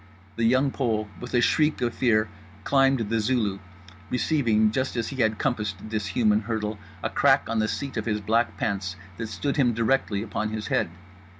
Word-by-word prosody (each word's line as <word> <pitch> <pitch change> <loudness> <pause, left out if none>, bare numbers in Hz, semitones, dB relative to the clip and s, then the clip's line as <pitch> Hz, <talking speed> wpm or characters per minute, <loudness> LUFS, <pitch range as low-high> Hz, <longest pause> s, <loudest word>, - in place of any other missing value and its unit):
The 115 - 0
Young 130 +4 +3
Pole 110 -6 -1
with 125 +1 -5
a 120 - +4
shriek 150 +5 +2
of 120 -1 0
fear 110 -4 +2 0.4
climbed 135 -5 +3
the 115 - +2
Zulu—receiving 105 - 0
just 130 +3 -1
as 115 -2 -1
he 135 - -7
had 110 -3 +2
compassed 105 -6 -1
this 110 -1 -4
human 105 -1 +2
hurdle 110 -1 -3 0.2
a - - 0
crack - - +3
on 115 - 0
the 110 - +2
seat 140 +2 -4
of 105 - -2
his 105 -2 0
black 115 +3 0
pants 95 -3 -2 0.2
that 115 - -4
stood 140 +6 -2
him 120 -5 +3
directly 115 -3 +1
upon 110 0 -3
his 110 0 -4
head. - - +1
110 Hz, 185 wpm, -26 LUFS, 105-125 Hz, 0.4 s, a